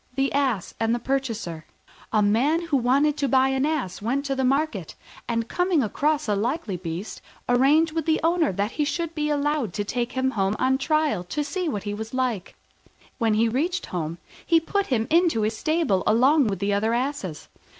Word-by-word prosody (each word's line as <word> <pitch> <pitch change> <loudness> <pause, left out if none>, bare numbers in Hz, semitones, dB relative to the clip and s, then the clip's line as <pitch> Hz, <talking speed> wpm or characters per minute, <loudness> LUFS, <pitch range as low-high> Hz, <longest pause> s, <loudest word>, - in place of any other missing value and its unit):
THE 270 0 0
ASS 260 -10 0
AND 225 +1 +1
HIS 240 - -6
PURCHASER 230 -12 -2 0.5
A 215 - +3
Man 250 +11 +3
who 310 -4 +1
wanted 275 +4 +2
to 280 - 0
buy 265 +1 +3
an 265 +2 +1
Ass 270 - -2
went 265 +6 -1
to 270 -1 -1
market, 260 - 0 0.3
and, 230 -1 -1
coming 355 -3 +1
across 295 +7 0
a 210 - +1
likely 230 - -2
looking 170 -2 -5
beast, 190 +6 -7 0.3
arranged 280 +6 +4
with 320 -1 -3
the 315 - +3
owner 330 - +2
that 200 +4 -2
he 300 - -1
should 335 +2 -2
be 300 -2 -1
allowed 290 - 0
to 205 - -2
take 240 +4 -3
him 260 0 0
home 195 -3 0
on 265 +1 +1
trial 305 - +1
to 295 +12 -2
see 340 +4 -2
what 205 -7 -3
he 205 0 -3
was 220 +3 -6
like. 245 -7 -2 0.6
When 225 -3 +2
he 225 +2 +3
reached 330 +10 -1
home, 165 -1 -3 0.3
he 335 -1 +4
put 400 +5 -1
him 230 -4 +1
into 330 -9 +3
his 220 +1 0
stable 310 - +1
along 260 +5 +4
with 195 -2 -1
the 200 +2 0
other 220 +3 +1
asses. 245 - -3
260 Hz, 200 wpm, -24 LUFS, 215-300 Hz, 0.6 s, arranged